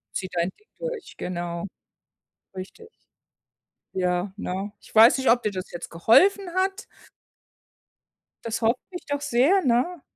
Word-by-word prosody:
Zieh 185 -1 -3
dein 175 +2 -1
Ding 425 - -31
durch, - - -6
genau. 175 0 -4 0.9
Richtig. 195 - -9 1.1
Ja, 180 +1 0
ne? 195 +1 -4
Ich - - -18
weiß 230 +4 +7
nicht, 265 - +2
ob 240 +1 +4
dir 210 - 0
das 185 -1 -6
jetzt 175 - -7
geholfen 360 - +4
hat. 385 +3 0 1.6
Das 230 +1 -2
hoffe 230 +3 +3
ich 355 - -8
doch 285 0 -2
sehr, 290 +10 +3
ne? 270 +6 +1
230 Hz, 135 wpm, -25 LUFS, -, 1.6 s, weiß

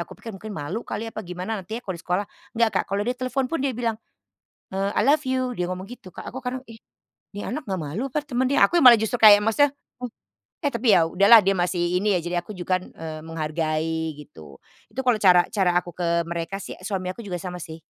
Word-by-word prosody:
aku 170 - -7
pikir 225 - -9
mungkin 195 +3 -9
malu 190 +2 -4
kali 215 -1 -5
apa - - -5
gimana 185 +3 -5
nanti 200 +5 -6
ya 245 - -8
kalau 190 - -3
di 170 - -9
sekolah, 180 +4 -1 0.3
nggak 230 -1 +4
Kak, - - +1
kalau 200 +1 -1
dia 245 - 0
telepon 255 +2 -2
pun 330 - 0
dia 275 - +1
bilang, 230 -2 -2 0.7
eee, 195 +1 -2
"I - - +1
love 290 +5 +3
you." 255 -1 -1
Dia 180 - -1
ngomong 185 +2 -5
gitu 215 -7 -11
Kak - - -8
aku 260 +2 -8
kadang, 255 +1 -3
"Ih, 225 - -11 0.6
nih 205 - -6
anak 305 - -4
nggak 190 -6 -3
malu 160 - -4
apa 300 - 0
temen 260 -4 -2
dia?" 280 - +5
Aku 345 -3 +2
malah 240 -3 +9
justru 220 +2 -1
yang 235 - -6
kayak 205 - +8
maksudnya 285 +6 +4 0.3
oh 245 - -4 0.5
eh, 285 - +2
tapi 235 +2 -2
ya 175 -5 +6
udahlah 200 +7 +7
dia 195 - +4
masih 175 0 0
ini 205 -3 +2
ya - - -1
jadi 175 +1 -2
aku 175 - -31
juga 185 +1 0
kan, - - -13
eee, 160 -1 -8
menghargai 160 0 -2
gitu. 80 - -13 0.3
Itu 260 +5 -5
kalau 240 -4 +2
cara 180 -2 +6
cara 180 -4 +2
aku 175 -1 -3
ke 170 -1 0
mereka 170 +3 -4
sih, 200 - -7
suami 185 -2 -3
aku 235 - -10
juga 190 -5 -4
sama 180 0 -6
sih, 160 +1 -8
195 Hz, 245 wpm, -24 LUFS, 175-235 Hz, 0.7 s, malah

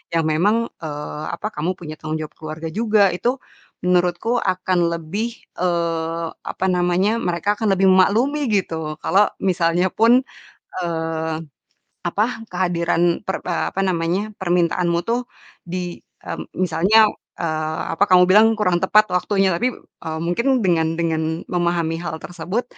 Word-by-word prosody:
yang 165 - +2
memang, 205 +9 +2 0.2
eee, 150 0 -5
apa, 210 - -4
kamu 160 +5 -1
punya 155 -2 -7
tanggung 155 0 -3
jawab 150 - -10
keluarga 155 +1 -6
juga, 215 0 +3
itu 245 +8 0 0.5
menurutku 180 +6 +1
akan 185 -2 +1
lebih, 205 +9 -4 0.2
eee, 170 -1 -1 0.2
apa 190 - -3
namanya, 180 +5 +1
mereka 180 +1 0
akan 220 -3 +1
lebih 190 +1 +3
memaklumi 240 +10 +3
gitu 160 -6 -1
kalo 200 +2 +4 0.2
misalnya 180 -1 +2
pun, 235 +4 +4 0.6
eee, 160 -1 -2 0.7
apa, 215 +8 0
kehadiran 175 -1 +1
per 190 - -2
apa 180 +2 -1
namanya, 185 +3 0
permintaanmu 175 -1 +1
tuh 240 +1 0 0.4
di 175 0 -4 0.2
mmm, - - -7
misalnya, 185 +5 +4 0.3
eee, 155 -1 -2
apa 195 - +3
kamu 180 0 +7
bilang 215 +3 +7
kurang 180 -4 +2
tepat 215 +3 +4
waktunya. 195 +1 +2
Tapi, 245 +8 0
eee, 160 0 -8
mungkin 235 +9 +1
dengan 165 -3 +2
dengan 160 0 -1
memahami 170 -2 0
hal 170 -1 -4
tersebut 185 +6 -3
180 Hz, 135 wpm, -21 LUFS, 165-205 Hz, 0.7 s, kamu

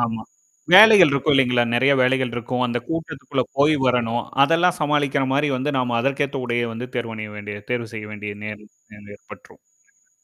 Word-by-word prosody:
ஆமா. 115 -2 -2 0.5
வேலைகள் 205 -5 +8
இருக்கும் 140 +2 0
இல்லைங்களா? 125 -2 +2
நெறைய 130 +4 +3
வேலைகள் 130 0 +1
இருக்கும். 125 +1 -3
அந்த 120 0 -2
கூட்டத்துக்குள்ள 145 -5 -4 0.2
போய் 150 +2 +4
வரணும். 120 -1 0 0.2
அதெல்லாம் 170 +4 +2
சமாளிக்கிற 145 -2 0
மாரி 145 +2 +1
வந்து 140 +4 -2
நாம 125 -2 -1
அதற்கேத்த 140 +2 -2
உடயே 120 0 -1
வந்து 115 +2 -6
தேர்வணிய 110 -3 -5
வேண்டிய 105 0 -7 0.2
தேர்வு 120 -2 -4
செய்ய 105 -1 -7
வேண்டிய 105 -1 -7
நேரம் 105 0 -9 0.5
ஏற்பட்ரும். - - -17 0.3
இல்லைங்களா? - - -38
125 Hz, 160 wpm, -21 LUFS, 115-145 Hz, 0.5 s, வேலைகள்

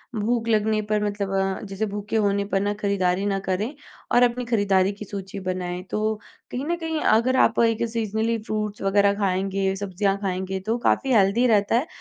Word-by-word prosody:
भूख 230 +2 0
लगने 215 -1 +2
पर 210 -1 +1
मतलब 200 -1 -2
अ, 195 0 0
जैसे 195 +3 -2
भूखे 205 +2 -5
होने 200 -2 +2
पर 195 - +2
ना, 205 +1 0
खरीदारी 200 -2 0
ना 195 -1 0
करें, 205 +9 -1 0.4
और 245 - +5
अपनी 245 0 +1
खरीददारी 200 -4 +2
की 210 +1 -9
सूची 195 0 -6
बनाएँ। 180 -1 -3
तो 215 +1 0 0.4
कहीं 260 +3 -3
न 345 - 0
कहीं, 320 -2 -3
अगर 235 +4 +3
आप 230 - 0
एक 225 0 +1
सीज़नली 225 0 -1
फ्रूट्स 210 -2 -3
वगैरह 200 +1 +3
खाएँगे, 195 0 0
सब्ज़ियाँ 195 0 -1
खाएँगे, 190 0 -2
तो 220 +5 -1
काफ़ी 270 -1 +2
हेल्दी 210 +4 +4
रहता 210 -1 +3
है 265 +8 +1
205 Hz, 185 wpm, -24 LUFS, 195-225 Hz, 0.4 s, और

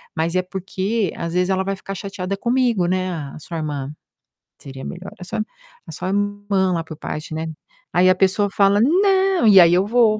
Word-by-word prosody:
Mas 165 +2 -1
é 185 - +3
porque 190 +2 -2
às 170 0 -4
vezes 180 +1 +1
ela 190 0 +1
vai 195 +1 -2
ficar 195 +1 -7
chateada 195 -1 -4
comigo, 235 -6 +1
né, 185 0 0
a 150 -4 -6
sua 165 +2 -7
irmã. 145 -2 -4 0.7
Seria 135 -1 -9
melhor 180 +2 -7
a 180 - -8
sua 220 +4 -3 0.5
a - - -8
sua 185 - -4
irmã 205 -2 0
lá, 165 -1 -1
por 160 -1 -10
parte, 155 0 -6
né?" 160 +1 -3 0.5
Aí 185 +1 +5
a 185 - +5
pessoa 195 +2 +2
fala: 200 +1 +3
"Não", 380 - +3
e 200 -2 +7
aí 170 0 +6
eu 185 +2 +3
vou 225 -2 +3
190 Hz, 200 wpm, -21 LUFS, 175-205 Hz, 0.7 s, e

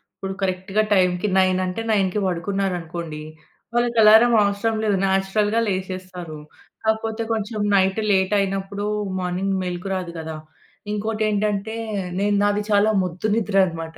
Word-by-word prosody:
ఇప్పుడు 195 0 -5
కరెక్ట్‌గా 190 +2 0
టైమ్‌కి, 180 0 +2
9 185 -1 +3
అంటే, 180 +4 -3
9 195 -3 +2 0.2
పడుకున్నారనుకోండి, 175 -4 -3 0.5
వాళ్ళకి 240 0 0
అలారం 220 +3 +7
అవసరం 200 +2 0
లేదు. 210 -2 +2
నేచురల్‌గా 195 +3 +1
లేసేస్తారు. 185 -4 -5 0.4
కాకపోతే, 220 +1 -1
కొంచెం 220 0 -3 0.2
నైట్ 190 +1 +2
లేటైనప్పుడు 195 +1 0 0.3
మార్నింగ్ 185 +2 -1
మెలుకు 180 +1 -4
రాదు 180 -2 -4
కదా! 160 -1 -6 0.6
ఇంకోటి 215 +1 -2
ఏంటంటే, 210 +1 -1 0.4
నేను 205 +1 +2
నాది 205 0 +1
చాలా 205 +1 +4
మొద్దు 180 +3 -3
నిద్ర 215 -3 -1
అనమాట. 165 -1 -7
195 Hz, 125 wpm, -22 LUFS, 185-210 Hz, 0.6 s, అలారం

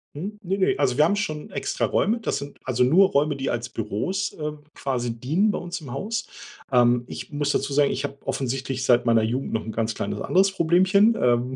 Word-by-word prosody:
Mhm. 205 +7 -6
Ne, 190 +2 -1
ne, 190 - +2
also 125 - +2
wir 150 - +6
haben 200 +6 +3
schon 155 -8 -3
extra - - -1
Räume. 225 +4 +1
Das - - -1
sind 140 0 -8
also 125 -1 +1
nur 180 +9 +5
Räume, 145 +1 +1
die 135 -1 -3
als 120 -1 -3
Büros, 115 - -2
äh, 150 -1 -4 0.2
quasi 125 -3 -2
dienen 170 - +2
bei - - -3
uns 175 -1 -6
im 135 - -9
Haus. 210 - -3 0.4
Ähm, 120 -1 +4
ich - - -8
muss 145 0 0
dazu 140 - -1
sagen, 145 0 +3
ich 145 - -2
habe 140 - -7
offensichtlich 135 0 -2
seit 120 -1 +4
meiner 115 -1 +4
Jugend 125 +5 -2
noch 110 - -2
'n 110 - -4
ganz 115 0 -1
kleines - - -4
anderes 190 +1 +3
Problemchen. 190 +6 +4
Ähm, 125 +1 +2
140 Hz, 220 wpm, -24 LUFS, 125-185 Hz, 0.4 s, wir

